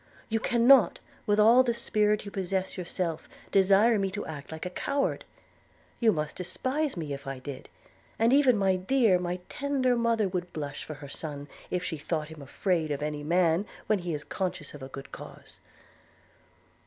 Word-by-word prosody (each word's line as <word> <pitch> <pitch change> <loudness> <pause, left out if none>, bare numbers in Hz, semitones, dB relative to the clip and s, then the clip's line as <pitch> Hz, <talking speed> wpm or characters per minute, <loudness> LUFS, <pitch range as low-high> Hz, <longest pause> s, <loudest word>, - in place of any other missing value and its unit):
You 225 0 +1
cannot, 240 +2 +5 0.3
with 205 0 +3
all 230 +4 +7
the 240 -2 0
spirit 210 -3 +1
you 200 - -7
possess 190 0 -2
yourself, 175 -2 -3 0.2
desire 200 +3 +5
me 195 -1 0
to 205 +2 -5
act 150 -2 -8
like 160 +2 -6
a 180 - -4
coward; 280 +8 -1 0.7
you 230 -2 +5
must 150 -4 -3
despise 260 - -2
me 155 -4 -3
if 140 0 -8
I 135 -1 -4
did: 130 +1 -8 0.5
and 230 +3 +3
even 270 -5 +5
my 190 -2 +2
dear, 205 -1 +3
my 180 0 -2
tender 270 -3 0
mother 230 -3 +2
would 180 -1 -4
blush 145 -2 -5
for 155 - -7
her 140 -1 -10
son, 145 -1 -6 0.2
if 180 0 -1
she 170 -3 -3
thought 150 +1 -3
him 160 -2 -10
afraid 160 +3 -1
of 145 0 -2
any 150 -1 -3
man 170 +4 +2 0.2
when 215 -2 +2
he 175 -3 -3
is 150 - -6
conscious 180 -4 -4
of 145 - -10
a 135 - -6
good 135 0 -9
cause.' - - -11
185 Hz, 180 wpm, -28 LUFS, 155-220 Hz, 0.7 s, all